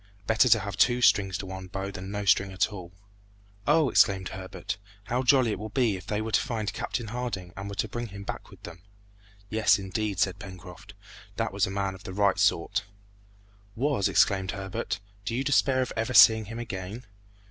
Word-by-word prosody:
Better 110 +3 +4
to - - +6
have 100 -2 -5
two 120 +3 +4
strings 95 -6 +3
to - - -6
one's 95 0 -7
bow 95 +1 -4
than 95 0 -7
no 100 0 -4
string 100 0 +3
at 95 +3 0
all!" 90 -3 -8 0.8
"Oh!" 160 -3 +4
exclaimed 95 -6 +3
Herbert, 95 +1 -6 0.2
"how 120 +4 -1
jolly 130 -2 +4
it 105 - -3
will 110 +1 -6
be 115 -3 +1
if 95 +2 -10
they 105 -1 -1
were 110 - -4
to 105 - +4
find 110 -5 -3
Captain 115 -2 -4
Harding 115 -7 -4
and 100 +1 -6
were 100 - -6
to 100 - -1
bring 120 0 -5
him 100 -1 -9
back - - -6
with - - -16
them!" 85 -1 -10 0.7
"Yes, 110 -1 +4
indeed!" 100 +1 -3
said 95 +1 0
Pencroft, 95 -2 -11 0.4
"that - - -2
was - - +1
a - - -4
man 100 0 -2
of 95 - -12
the 95 - -7
right 100 0 +2
sort." 100 +5 +1 0.9
"Was!" 130 -5 +1
exclaimed 95 -1 +2
Herbert, 95 -1 -4 0.2
"do 115 - -3
you 130 - 0
despair 135 -2 +3
of - - -6
ever 115 +3 -2
seeing 110 +1 +8
him 115 +3 -7
again?" 110 0 -6
100 Hz, 200 wpm, -27 LUFS, 95-115 Hz, 0.9 s, seeing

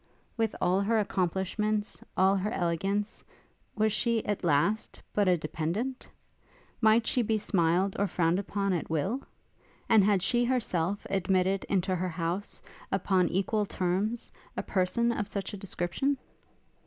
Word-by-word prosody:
With 225 -2 0
all 185 +2 +2
her 225 +3 +2
accomplishments, 205 +2 -1
all 190 +1 +5
her 195 +2 -1
elegance, 195 +4 -1 0.5
was 215 -1 +2
she, 230 0 +1
at 205 -2 -2
last, 175 +7 +1
but 205 -2 +2
a 180 -1 +4
dependent? 170 - -3 0.7
Might 220 +1 +5
she 250 - +2
be 220 -1 +1
smiled 185 -1 +1
or 200 - +2
frowned 175 0 +1
upon 200 -1 -1
at 170 - -2
will? 190 - 0 0.7
And 220 -3 +6
had 200 -2 +3
she 240 -1 +3
herself 205 -7 0
admitted 190 0 +1
into 190 -1 0
her 180 +1 -1
house, 175 +4 -3 0.3
upon 190 -2 +2
equal 205 +3 0
terms, 195 +7 -1 0.3
a - - -1
person 210 +5 +1
of 210 -3 -2
such 200 0 -4
a - - -4
description? 195 +9 -1
195 Hz, 140 wpm, -29 LUFS, 180-215 Hz, 0.7 s, And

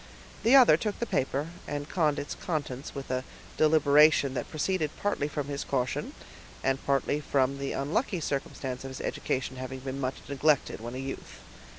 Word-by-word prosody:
The 235 +4 +5
other 245 - +8
took 210 +4 -2
the 235 - -1
paper, 140 - -1 0.2
and 145 0 -3
conned 155 -5 +1
its 145 - -4
contents 145 -6 -4
with 135 -2 -5
a 130 0 0 0.3
deliberation 150 -2 +5
that 130 - -3
proceeded 160 0 0
partly 200 -8 0
from 145 -1 -3
his 140 0 -3
caution, 130 -2 -2 0.5
and 135 0 +1
partly 140 +1 +2
from 140 -2 +1
the 140 0 -2
unlucky 170 - 0
circumstance 135 -3 -3
of 135 - -5
his 130 - -7
education 130 0 -2
having 130 0 -6
been 135 +1 -4
much 130 0 -1
neglected 140 -3 +1
when 120 +2 -6
a - - -4
youth. 135 +1 -6
140 Hz, 175 wpm, -29 LUFS, 135-155 Hz, 0.5 s, other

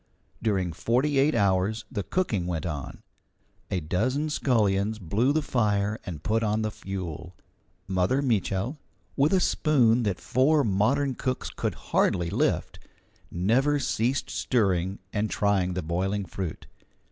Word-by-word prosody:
During 95 -6 0
forty 135 - +1
eight 145 +3 +3
hours 100 +1 +1
the 105 - -2
cooking 105 - -1
went 85 -1 -2
on; 75 -6 -5 0.7
a 95 - 0
dozen 130 - -1
scullions 110 -6 +1
blew 110 - +1
the 155 +1 +1
fire 105 -4 0
and 80 -4 -6
put 110 +4 +1
on 110 0 0
the 110 - -1
fuel. 90 -4 -6 0.5
Mother 95 +9 +1
Mitchel, 110 - 0 0.4
with 140 +3 +3
a 190 - +4
spoon 125 -9 +3
that 100 -6 -1
four 145 +3 +3
modern 120 +7 +1
cooks 130 +1 -3
could - - -3 0.2
hardly 85 -2 +2
lift, - - 0 0.5
never 125 +12 +2
ceased 130 -1 -1
stirring 95 -5 0 0.2
and 105 +1 0
trying 95 -3 +1
the 90 - -2
boiling 95 +5 -1
fruit. 90 -1 -5
105 Hz, 135 wpm, -27 LUFS, 95-130 Hz, 0.7 s, a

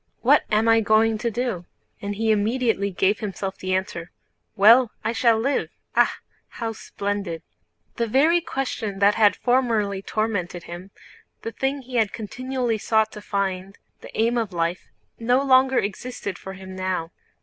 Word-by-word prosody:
What - - +4
am 215 +2 +3
I 225 0 +5
going 220 +1 +3
to 235 - -1
do?" 230 -6 -3 0.4
And 205 0 -4
he 220 +1 +1
immediately 215 -1 +1
gave 195 +2 +1
himself 195 -2 -5
the 185 0 -1
answer: 175 -2 -3 0.5
"Well, 225 +4 +6
I 220 - 0
shall 235 -1 +3
live. 270 +6 0 0.3
Ah, - - +4 0.4
how 230 -2 -5
splendid!" 200 -6 -4 0.5
The 235 - 0
very 310 +9 +3
question 250 - -3
that 200 +1 +4
had 210 -2 +4
formerly 225 -6 +1
tormented 195 -5 -2
him, 175 +3 -9 0.5
the 225 - -4
thing 270 +3 -2
he 250 0 -4
had 220 -3 +2
continually 245 +1 -3
sought 220 +1 +2
to 210 - -9
find—the 195 -1 -5
aim 235 +2 +2
of 220 -4 -3
life—no 185 +8 -2
longer 265 -1 +4
existed 200 0 -3
for 190 - -8
him 190 0 -10
now. 185 -3 -2
215 Hz, 150 wpm, -23 LUFS, 195-240 Hz, 0.5 s, Well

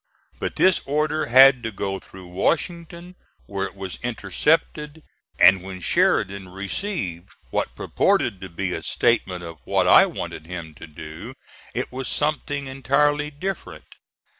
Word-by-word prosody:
But - - -3
this 185 -1 +4
order 150 +2 0
had 130 +1 +7
to 115 - -4
go 95 -1 -3
through 95 -1 -13
Washington 170 - -2 0.3
where 100 -1 -3
it - - -15
was 95 -2 -7
intercepted; 150 - -1 0.4
and 95 -1 +7
when 95 0 -8
Sheridan 95 +1 +1
received 95 - -4 0.2
what - - -2
purported 95 - +1
to 95 - -7
be 85 - -3
a - - -4
statement 95 -6 0
of 85 -2 -9
what - - +1
I - - +8
wanted 80 - -7
him 85 -3 -7
to 85 - -11
do 80 - -9 0.4
it - - -3
was 130 0 -5
something 145 -1 -1
entirely 145 +3 +1
different. 145 - -6
115 Hz, 140 wpm, -23 LUFS, 95-150 Hz, 0.4 s, I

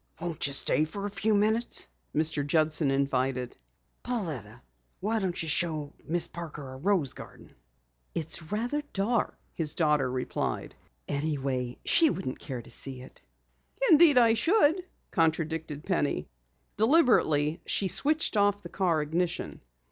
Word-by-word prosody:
"Won't 165 -3 0
you 140 - -2
stay 150 - +2
for 200 +6 -6
a 205 - -3
few 205 +2 +1
minutes?" 220 +3 +1 0.3
Mr. 155 -2 +1
Judson 155 0 +2
invited. 130 -2 0 0.5
"Pauletta, 155 - -4 0.4
why 220 +3 0
not 185 -3 -2
show 155 -2 0
Miss 170 +2 +1
Parker 155 -5 -8
our 130 0 -9
rose 175 -5 +1
garden?" - - -12 0.6
"It's 160 0 -2
rather 240 +8 -1
dark," 215 +5 0 0.2
his 155 -3 -2
daughter 150 -5 +2
replied. 130 0 -3 0.3
"Anyway, 135 -4 -2
she 325 -2 +5
wouldn't 180 - -4
care 125 -3 -6
to - - -12
see 130 -2 -6
it." 130 - -15 0.7
"Indeed, 310 -3 +7
I 230 -2 +6
should," 330 - +3 0.3
contradicted 160 -2 0
Penny. 145 - 0 0.5
Deliberately 210 - +3
she 195 - +2
switched 305 - +1
off 205 0 +2
the 175 - -8
car 170 -5 +1
ignition. 165 +3 -2
165 Hz, 135 wpm, -28 LUFS, 145-205 Hz, 0.7 s, Indeed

